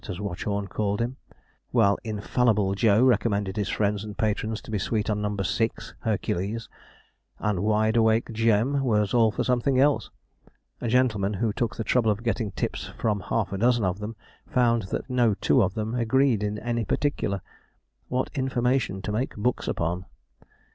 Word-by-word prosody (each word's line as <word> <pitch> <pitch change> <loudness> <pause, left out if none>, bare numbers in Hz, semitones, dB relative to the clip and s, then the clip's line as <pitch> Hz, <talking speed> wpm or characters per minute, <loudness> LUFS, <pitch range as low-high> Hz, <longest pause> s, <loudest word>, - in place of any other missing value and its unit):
as 90 -1 -4
Watchorn 100 +1 -3
called 100 0 -1
him), 120 +3 -2 0.5
while 105 -5 +3
'Infallible 105 -2 +1
Joe' 105 +2 +4
recommended 105 -5 +1
his 105 -3 -1
friends 105 -1 0
and 105 -1 -8
patrons 110 0 -1
to - - -9
be 105 - 0
sweet 105 +2 -1
on 105 0 -1
No. 105 0 -2
6 110 +4 -1
(Hercules), 105 0 -2 0.7
and 105 -3 -1
'Wide 110 +2 +2
awake 110 0 +3
Jem' 115 +5 +2
was 105 -5 +1
all 115 -2 +5
for 110 - -2
something 125 +1 +1
else. 145 +1 +3 0.7
A 120 - -2
gentleman 110 -5 +2
who 110 +1 0
took 120 0 -2
the 115 - -3
trouble 115 -1 +2
of 105 +2 -1
getting 115 -2 -1
tips - - -3
from 105 -2 0
half 100 0 -2
a 95 - -3
dozen 120 0 +3
of 90 +2 -1
them, 105 +2 -5 0.3
found 120 -2 +2
that - - -3
no 120 -5 +2
two - - +3
of 95 0 0
them 110 +1 -2
agreed 125 -1 +2
in 105 0 -2
any 120 +1 -2
particular. 100 -5 -1 0.7
What 130 +1 -1
information 125 -6 0
to - - -3
make 115 +5 -2
books 120 +4 -1
upon! 85 +2 -2
110 Hz, 170 wpm, -26 LUFS, 100-120 Hz, 0.7 s, all